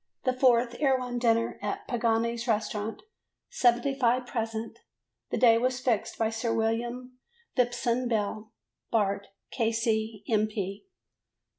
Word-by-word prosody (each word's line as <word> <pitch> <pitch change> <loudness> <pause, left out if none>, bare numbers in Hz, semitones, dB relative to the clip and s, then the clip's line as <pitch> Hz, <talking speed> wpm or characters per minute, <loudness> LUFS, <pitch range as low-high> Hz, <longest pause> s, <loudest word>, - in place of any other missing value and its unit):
The 255 - +2
fourth 245 -2 +3
Erewhon 255 -4 +1
dinner 230 -1 +1
at 205 0 -4
Pagani's 235 0 0
Restaurant; 215 -1 -1 0.5
75 250 0 +2
present: 225 -1 -4 0.5
the - - -1
day 230 -2 +6
was 255 +1 0
fixed 245 -5 0
by 225 -1 +1
Sir 225 +1 -2
William 240 +3 -2 0.4
Phipson 245 0 +1
Beale, 215 -1 -2 0.4
Bart., 200 -3 0 0.2
K.C., 225 -2 0
M. 215 -1 +2
230 Hz, 110 wpm, -28 LUFS, 225-245 Hz, 0.5 s, day